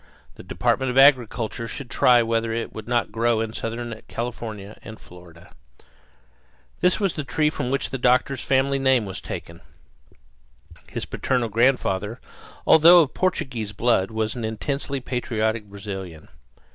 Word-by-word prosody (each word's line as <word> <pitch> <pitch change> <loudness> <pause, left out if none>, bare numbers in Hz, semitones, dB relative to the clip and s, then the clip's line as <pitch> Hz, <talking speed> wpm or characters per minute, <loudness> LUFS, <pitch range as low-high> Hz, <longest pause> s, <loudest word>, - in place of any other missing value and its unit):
The - - -12
Department 130 -1 0
of 125 - -2
Agriculture 120 -4 +3
should 120 +4 -7
try 120 -2 +5
whether 115 0 -1
it 115 0 -4
would 110 0 -8
not 120 -4 0
grow 115 +1 +1
in 110 0 -3
southern 115 0 -5
California 110 -4 -6
and 110 0 -10
Florida. 90 -1 -16 1.3
This 180 +3 +2
was 195 -4 0
the 150 - -4
tree 150 +2 0
from 125 - -3
which 135 +1 -2
the 135 - -4
doctor's 125 +1 +2
family 135 +1 +1
name 130 -4 +3
was 95 - -6
taken. 85 0 -8 1.3
His - - -4
parental 125 -3 -1
grandfather, 115 -2 +1 0.5
although 165 +2 +8
of 145 - -6
Portuguese 125 - -2
blood, 115 -3 +1
was 110 -1 -2
an 120 - -6
intensely 135 +5 -3
patriotic 115 -3 -2
Brazilian. 95 -5 -8
115 Hz, 145 wpm, -23 LUFS, 110-130 Hz, 1.3 s, although